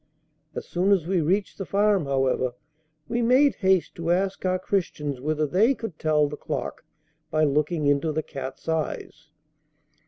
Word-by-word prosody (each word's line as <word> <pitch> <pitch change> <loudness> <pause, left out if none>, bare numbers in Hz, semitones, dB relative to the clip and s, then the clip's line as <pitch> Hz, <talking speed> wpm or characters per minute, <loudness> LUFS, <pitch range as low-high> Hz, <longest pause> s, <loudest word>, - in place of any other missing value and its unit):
As - - -5
soon 185 +3 +1
as 190 -6 +3
we 180 -1 +1
reached 190 +8 0
the - - -2
farm, 200 -4 +2
however, 130 -2 0 0.5
we 240 0 -1
made 255 +4 +4
haste 190 -3 +2
to 165 0 -4
ask 190 +2 0
our 185 0 +2
Christians 150 -8 -2
whether 155 +2 0
they 210 - +3
could 225 -10 -7
tell 150 -1 +2
the 145 - -6
clock - - -5 0.5
by 155 0 +1
looking 150 +2 +1
into 145 +3 +2
the 155 +1 -2
cat's 135 +1 -8
eyes. 160 0 -3
165 Hz, 160 wpm, -25 LUFS, 150-195 Hz, 0.5 s, made